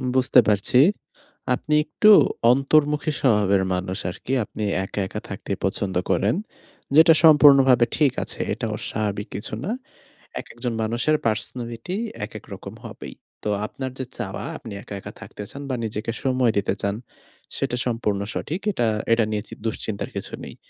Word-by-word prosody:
বুঝতে 130 Hz, 0 st, +5 dB
পারছি। 105 Hz, +4 st, +3 dB, 0.8 s
আপনি 150 Hz, +3 st, -1 dB
একটু 210 Hz, +7 st, +4 dB, 0.4 s
অন্তর্মুখী 150 Hz, +2 st, +2 dB
স্বভাবের 100 Hz, -6 st, +3 dB
মানুষ 95 Hz, +1 st, -2 dB
আরকি। 130 Hz, +8 st, -5 dB
আপনি 105 Hz, -, -6 dB, 0.2 s
একা, 100 Hz, -, -5 dB
একা 105 Hz, -, -5 dB
থাকতে 100 Hz, 0 st, -6 dB
পছন্দ 95 Hz, -1 st, -1 dB, 0.2 s
করেন। 105 Hz, +9 st, +2 dB, 0.6 s
যেটা 160 Hz, +1 st, +8 dB
সম্পূর্ণভাবে 135 Hz, -5 st, +7 dB
ঠিক 145 Hz, -4 st, +4 dB
আছে। -, -, -6 dB
এটা 115 Hz, +2 st, -4 dB
অস্বাভাবিক 105 Hz, -2 st, -3 dB
কিছু 105 Hz, -, -5 dB
না। 200 Hz, -, -2 dB, 0.7 s
একেকজন 120 Hz, 0 st, -5 dB
মানুষের 120 Hz, +8 st, +1 dB
পার্সোনালিটি 115 Hz, -, -2 dB, 0.3 s
একেক 110 Hz, -1 st, -9 dB
রকম 100 Hz, +2 st, -9 dB
হবেই। 115 Hz, -, -9 dB, 0.3 s
তো 105 Hz, -, 0 dB, 0.2 s
আপনার 130 Hz, +2 st, -6 dB
যে 130 Hz, -, -2 dB
চাওয়া 95 Hz, -5 st, -4 dB
আপনি 110 Hz, -, -9 dB
একা, -, -, -9 dB
একা -, -, -9 dB
থাকতে 105 Hz, -, -9 dB
চান 140 Hz, -, -8 dB
বা 130 Hz, -, 0 dB
নিজেকে 110 Hz, +1 st, -3 dB
সময় 130 Hz, -3 st, +2 dB
দিতে 100 Hz, -, 0 dB
চান 100 Hz, 0 st, 0 dB, 0.6 s
সেটা 125 Hz, -, -1 dB
সম্পূর্ণ 115 Hz, -4 st, -1 dB
সঠিক। 170 Hz, +6 st, -3 dB
এটা 120 Hz, -9 st, 0 dB, 0.3 s
এটা 115 Hz, -1 st, +4 dB
নিয়ে 105 Hz, -1 st, -1 dB
চি -, -, -8 dB
দুশ্চিন্তার 110 Hz, -1 st, -3 dB
কিছু -, -, -4 dB
নেই। -, -, -9 dB
115 Hz, 150 wpm, -23 LUFS, 105-135 Hz, 0.8 s, যেটা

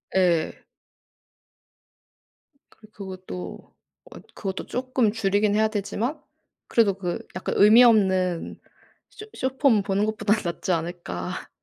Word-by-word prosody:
예. 175 Hz, -4 st, +2 dB, 2.1 s
그리고 215 Hz, -1 st, -20 dB
그것도 185 Hz, -, -9 dB, 0.4 s
어 -, -, -10 dB, 0.2 s
그것도 195 Hz, -1 st, -4 dB
조금 250 Hz, -3 st, 0 dB
줄이긴 205 Hz, -1 st, +1 dB
해야 220 Hz, 0 st, +3 dB
되지만 225 Hz, +7 st, -3 dB, 0.5 s
그래도 215 Hz, -4 st, +3 dB
그 180 Hz, -3 st, -3 dB, 0.2 s
약간 185 Hz, -, -3 dB
의미 220 Hz, +4 st, +8 dB
없는 190 Hz, -6 st, +2 dB, 0.5 s
쇼 425 Hz, -, -11 dB
숏폼 260 Hz, -5 st, +2 dB
보는 200 Hz, +1 st, 0 dB
것보다는 215 Hz, 0 st, 0 dB
낫지 175 Hz, +1 st, -3 dB
않을까? 165 Hz, -, -4 dB
205 Hz, 230 characters per minute, -24 LUFS, 185-225 Hz, 2.1 s, 의미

